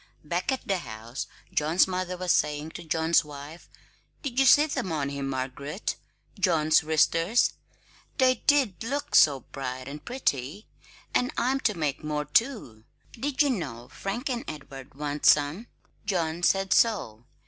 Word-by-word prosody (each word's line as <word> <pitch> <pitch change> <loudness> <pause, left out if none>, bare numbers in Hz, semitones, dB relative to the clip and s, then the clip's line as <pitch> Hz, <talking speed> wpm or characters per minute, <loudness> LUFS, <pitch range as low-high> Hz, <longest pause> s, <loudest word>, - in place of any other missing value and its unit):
Back 175 - -1
at 260 -1 -3
the 195 -3 +1
house 115 -1 -7 0.3
John's 160 +6 +3
mother 185 -1 -3
was 180 -1 0
saying 150 -2 0
to - - -8
John's 160 +1 +2
wife: 150 +3 -10 0.5
"Did 265 -3 -2
you 270 - +5
see 295 +4 +7
them 235 - -3
on 145 -3 -1
him, 140 -1 -4
Margaret? 135 +6 -4 0.4
John's 155 -4 +3
wristers? 165 +7 +2 0.6
They 255 -3 +3
did 270 -11 +3
look 285 +5 -3
so 140 -3 +6
bright 130 -1 -6
and 150 +2 -8
pretty! 165 - -2 0.5
And 250 - +1
I'm 265 +2 +1
to 210 -7 0
make 150 -3 -2
more, 150 -1 -2
too; 150 - 0 0.3
did 275 +4 0
you 285 - +2
know? 125 - -5
Frank 220 +7 -4
and 245 -3 -2
Edward 140 -3 -9
want 145 0 -4
some; 150 +10 +3 0.4
John 170 -4 -1
said 195 +2 +3
so. 155 - +1
165 Hz, 150 wpm, -27 LUFS, 145-225 Hz, 0.6 s, see